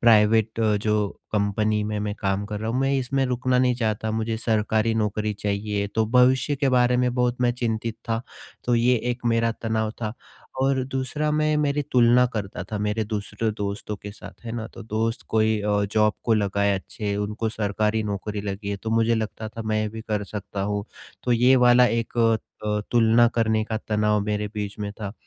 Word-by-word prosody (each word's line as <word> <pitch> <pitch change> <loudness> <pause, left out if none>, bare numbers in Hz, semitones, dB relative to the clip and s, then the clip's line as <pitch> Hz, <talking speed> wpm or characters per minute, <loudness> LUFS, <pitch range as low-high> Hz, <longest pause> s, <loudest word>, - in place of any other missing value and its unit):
Private 110 0 +4
अ, 110 -1 +3
जो 105 -1 +1 0.2
company 105 +1 +1
में 105 0 -2
मैं 105 0 -2
काम 100 -1 -1
कर 105 0 -4
रहा 110 +1 -2
हूँ, 125 - -1
मैं 135 +1 +1
इसमें 135 +1 0
रुकना 125 0 +1
नहीं 125 -1 +3
चाहता 110 -2 -1
मुझे 110 0 -1
सरकारी 110 0 +1
नौकरी 105 -1 0
चाहिए, 100 0 -2
तो 110 +2 0
भविष्य 130 +4 +3
के 140 -1 +1
बारे 125 -1 +3
में 125 -1 +1
बहुत 125 0 0
मैं 120 -1 +3
चिंतित 115 -2 -2
था, 115 +1 0 0.4
तो 120 - +2
ये 120 +2 +4 0.2
एक 120 0 -5
मेरा 115 0 +2
तनाव 110 -1 0
था 105 0 -2 0.5
और 135 -1 +2
दूसरा 135 +3 -2
मैं 155 0 +2
मेरी 145 -1 +1
तुलना 125 0 +5
करता 100 -3 -4
था 105 - -1
मेरे 105 +1 -1
दूसरे 105 +1 -2
दोस्तों 105 0 -4
के 105 - -9
साथ, 110 - -13
है 115 - -5
ना? 115 -1 -4
तो - - -11
दोस्त 115 +2 -2
कोई 110 -1 +2
अ, 105 0 +1
जॉब 105 -1 +3
को 115 - +3
लगाए 100 -1 +1
अच्छे 100 +2 -4
उनको 105 +2 -2
सरकारी 110 +1 0
नौकरी 105 0 -3
लगी 100 0 -5
है, 100 - -2
तो 110 +2 -5
मुझे 115 +1 +3
लगता 110 0 -3
था 115 +1 -7
मैं 110 0 +1
भी 110 - -7
कर 105 -1 -1
सकता 100 0 -6
हूँ, 105 0 -2 0.4
तो 125 - +1
ये 125 +3 +5
वाला 125 0 +6
एक 115 -1 -1
क 115 -1 +3 0.5
तुलना 120 0 +5
करने 110 -1 +2
का 110 -1 -3
तनाव 105 0 +2
मेरे 105 0 -1
बीच 105 0 -4
में 105 -1 -3
था 100 -1 -4
110 Hz, 195 wpm, -24 LUFS, 105-120 Hz, 0.5 s, वाला